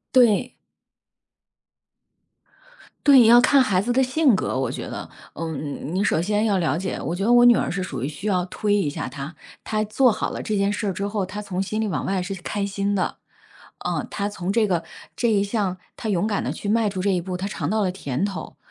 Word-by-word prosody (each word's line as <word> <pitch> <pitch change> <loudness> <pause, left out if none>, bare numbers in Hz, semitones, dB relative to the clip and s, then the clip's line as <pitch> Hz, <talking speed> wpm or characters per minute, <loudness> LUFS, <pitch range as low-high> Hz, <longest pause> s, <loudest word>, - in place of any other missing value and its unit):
对。 245 0 +4 2.5
对， 265 -5 +8
要 240 +1 +8
看 265 +2 +5
孩 195 -7 +2
子 240 +5 0
的 265 - +3
性 260 -2 +3
格 130 - -1
我 130 -3 -1
觉 - - -5
得。 - - -6 0.3
嗯， 155 -1 -5
你 195 +2 +1
首 160 - +2
先 210 +4 +1
要 200 -3 +2
了 160 -5 +1
解， 185 +2 -3
我 170 - -3
觉 195 - -3
得 235 - +3
我 245 0 +7
女 240 -1 +8
儿 - - 0
是 185 0 -2
属 135 -9 -5
于 135 - -1
需 155 +7 -8
要 185 -3 +2
推 205 +2 -1
一 195 -7 +2
下 145 - -4
她， 140 +4 -7 0.3
她 215 0 -1
做 240 +3 +3
好 215 - -2
了 - - -5
这 210 -2 -2
件 200 +1 +1
事 210 0 -2
儿 - - +1
之 200 +3 -3
后， 205 -2 -2
她 185 +3 -6
从 190 -3 -3
心 215 +3 -2
里 220 - 0
往 190 - -2
外 190 -1 -1
是 180 +2 -3
开 205 +1 -2
心 200 0 -1
的。 185 - -1 0.7
嗯， - - -2
她 200 0 -2
从 190 -2 -3
这 215 -1 +2
个 170 -3 0 0.3
这 235 -2 +1
一 200 -1 +3
项 200 -3 -1 0.2
她 220 - -5
勇 205 +2 +1
敢 205 - -1
地 - - -2
去 205 - -6
迈 225 0 +2
出 190 -2 -3
这 200 - +2
一 180 -2 +1
步， 180 +1 -4
她 195 +2 -3
尝 - - -3
到 215 0 +1
了 185 - +1
甜 145 -4 -3
头， 190 -6 -5
200 Hz, 250 characters per minute, -23 LUFS, 180-215 Hz, 2.5 s, 对